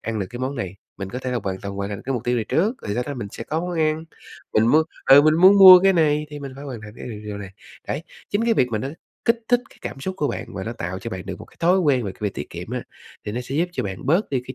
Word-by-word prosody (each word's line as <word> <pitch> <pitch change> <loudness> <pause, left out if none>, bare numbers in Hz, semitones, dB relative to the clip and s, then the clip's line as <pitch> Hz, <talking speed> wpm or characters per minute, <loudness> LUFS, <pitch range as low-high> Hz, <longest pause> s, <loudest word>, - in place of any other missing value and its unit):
ăn 115 0 -3
được 100 - -2
cái 120 - -7
món 130 +2 -2
này, 100 -5 -4 0.2
mình 95 -1 -5
có 125 - -4
thể 130 0 -4
là 125 - 0
hoàn 95 -1 -3
toàn 100 0 -6
hoàn 100 0 -3
thành 100 - -4
được - - -12
cái 135 - 0
mục 120 - -3
tiêu 125 0 +1
này 115 - -1
trước, 200 - +1
rồi 100 - -3
sau 120 - 0
đó 145 - -4
mình 115 -6 -5
sẽ 115 - -7
có 155 +5 -2
món 175 -1 -3
ăn. 155 0 +1 0.5
Mình 110 +1 +4
muốn 155 +6 +5 0.3
ừ, 140 +2 +10
mình 155 +1 +4
muốn 190 +4 +7
mua 185 -2 +12
cái 195 +1 +5
này 150 -3 +2
thì 150 - -7
mình 140 -2 -7
phải 140 - -9
hoàn 130 -5 -6
thành 105 -1 -10
cái - - -8
điều 105 -2 -7
điều 105 -1 -5
này." 100 -2 -8 0.4
Đấy, 145 - -2 0.3
chính 205 +3 +1
cái 230 -1 +3
việc 125 - +2
mà 110 - +1
nó 130 - -3 0.4
kích 230 0 +3
thích 245 0 +4
cái - - -20
cảm 135 - -6
xúc 190 +7 -3
của 145 - +1
bạn - - -4
và 95 - -4
nó 115 - -4
tạo 95 -5 -5
cho 115 - -6
bạn 95 -3 -6
được - - -5
một 110 - -9
cái - - -23
thói 175 +3 +4
quen 140 -9 +2
về 95 - -4
cái - - -22
việc 105 -2 -1
tiết - - -6
kiệm - - -7
á, - - -3 0.4
thì 105 - -3
nó 120 - -2
sẽ 125 +2 -6
giúp 170 +4 +1
cho 130 - -2
bạn 95 +1 -6
bớt 170 +9 +2
đi 135 -3 0
cái 130 - -7
130 Hz, 340 wpm, -23 LUFS, 105-160 Hz, 0.5 s, mua